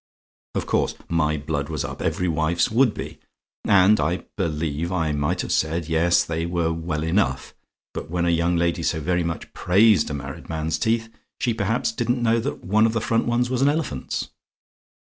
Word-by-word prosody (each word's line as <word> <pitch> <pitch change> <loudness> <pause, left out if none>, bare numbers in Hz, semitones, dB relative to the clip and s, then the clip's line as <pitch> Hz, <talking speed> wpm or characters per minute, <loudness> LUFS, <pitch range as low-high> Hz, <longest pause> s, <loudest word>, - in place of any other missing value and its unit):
Of - - -1
course - - 0
my 75 -2 +1
blood 75 -1 -3
was 75 -3 -2
up - - -7
every 90 - 0
wife's 85 +2 +1
would 120 +1 +4
be: - - -7 0.5
and 100 +2 +5
I 85 +4 0
believe 80 -2 -2
I 80 -4 0
might 75 0 0
have - - -4
said, 80 0 0
'Yes, 85 +2 +3
they 80 0 -3
were 85 -1 0
well 80 -2 -3
enough; 80 -5 0 0.4
but - - -6
when 85 0 0
a 85 - +3
young 85 +1 +2
lady 85 0 +1
so 80 0 0
very 90 +3 0
much 80 -1 -5
praised 105 +4 +4
a 75 - -3
married 70 -1 -8
man's 80 0 -2
teeth, 115 0 0 0.3
she 120 - +1
perhaps 110 +2 0
didn't 120 +1 -1
know 115 0 +3
that 115 - -4
one 110 +4 +4
of 115 - -2
the 115 - +1
front 115 +1 0
ones 120 +1 +1
was 130 0 0
an 140 - +5
elephant's.' 145 - -2
85 Hz, 190 wpm, -23 LUFS, 80-110 Hz, 0.5 s, and